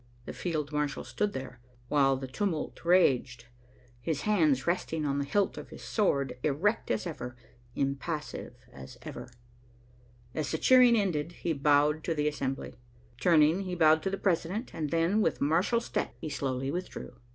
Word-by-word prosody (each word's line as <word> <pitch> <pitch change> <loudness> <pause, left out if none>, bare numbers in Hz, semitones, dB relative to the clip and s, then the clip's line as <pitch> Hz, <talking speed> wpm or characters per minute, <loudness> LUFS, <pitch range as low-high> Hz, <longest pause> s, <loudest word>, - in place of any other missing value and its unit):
The - - -6
field 155 -4 -3
marshal 150 -1 -1
stood 200 +13 -2
there, 130 -2 -7 0.3
while 135 -1 +3
the 135 - -5
tumult 160 +4 -3
raged, 130 -9 +3 0.5
his 145 +3 -2
hands 155 -11 +2
resting 165 -3 -1
on 140 0 0
the - - 0
hilt 200 +7 0
of - - -10
his - - -11
sword, 140 - 0
erect 165 - 0
as 110 -1 0
ever, 125 0 -6 0.4
impassive 140 +3 -3 0.2
as 65 0 -11
ever. - - -8 1.0
As 155 -4 -2
the - - 0
cheering 250 -2 +6
ended, 175 -5 -1
he 170 -1 -2
bowed 150 +1 +3
to 165 - 0
the 150 0 +1
assembly. 135 -3 -3 0.5
Turning, 160 0 +4
he 185 -2 -4
bowed 160 -2 +5
to 190 - -1
the 195 - -2
president, 190 +5 -1
and 155 -2 -3
then, 170 +7 +2
with 165 - +1
martial 170 +11 +2
step, 230 - -3
he 155 - -5
slowly 135 -1 -2
withdrew. 180 +3 -5
155 Hz, 165 wpm, -30 LUFS, 140-180 Hz, 1.0 s, cheering